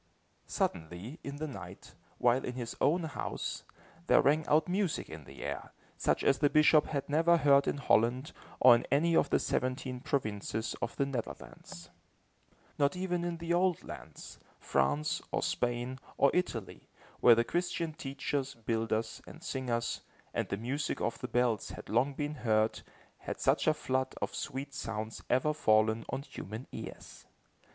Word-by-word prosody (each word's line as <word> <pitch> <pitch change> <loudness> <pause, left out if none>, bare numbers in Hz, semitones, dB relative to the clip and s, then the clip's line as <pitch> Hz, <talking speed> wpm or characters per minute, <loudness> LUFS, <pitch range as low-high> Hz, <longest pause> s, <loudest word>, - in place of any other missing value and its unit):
Suddenly, 90 - -3
in 140 - -5
the 155 +2 -4
night, 95 - -9 0.2
while 125 +2 +3
in 125 - -3
his 120 -2 -5
own 170 +4 +3
house, 155 -3 -4 0.4
there - - +6
rang 150 +2 +3
out 155 +1 +4
music 185 -2 0
in 80 -2 -9
the 70 - -10
air, - - -5 0.2
such - - +1
as 135 - +3
the 145 - +4
bishop 155 0 +5
had 140 -2 -2
never 165 +4 +4
heard 140 -2 +5
in - - 0
Holland, 125 +1 +2 0.3
or 125 -1 +9
in 120 - +1
any 165 +4 +3
of 145 - +4
the - - +4
seventeen 130 0 -1
provinces 110 -4 -2
of - - -2
the 140 - +1
Netherlands. 115 -8 -7 0.9
Not 140 +3 +3
even 180 -1 -1
in 175 -1 -2
the 170 +1 -2
old 180 0 +2
lands, - - -10 0.2
France, 145 - 0
or - - 0
Spain, 120 +2 -1 0.2
or 140 - +5
Italy, 120 - -2 0.3
where 120 - +8
the 115 - +3
Christian 170 +2 -1
teachers, 140 -1 -3
builders 115 0 -1
and 165 - -12
singers, 120 -3 -2 0.3
and - - -1
the 100 - -1
music 130 +7 -2
of - - -2
the 125 - -4
bells 120 -3 +1
had - - -9
long 130 +5 +2
been 145 +1 -2
heard, 110 -1 +2 0.4
had - - -5
such - - +2
a 155 - +6
flood 130 -2 -1
of - - -3
sweet 135 +2 -4
sounds 110 -3 -4
ever 130 +5 +3
fallen 110 -5 +3
on 135 - -3
human 110 -1 -7
ears. - - -9
130 Hz, 160 wpm, -32 LUFS, 115-150 Hz, 0.9 s, or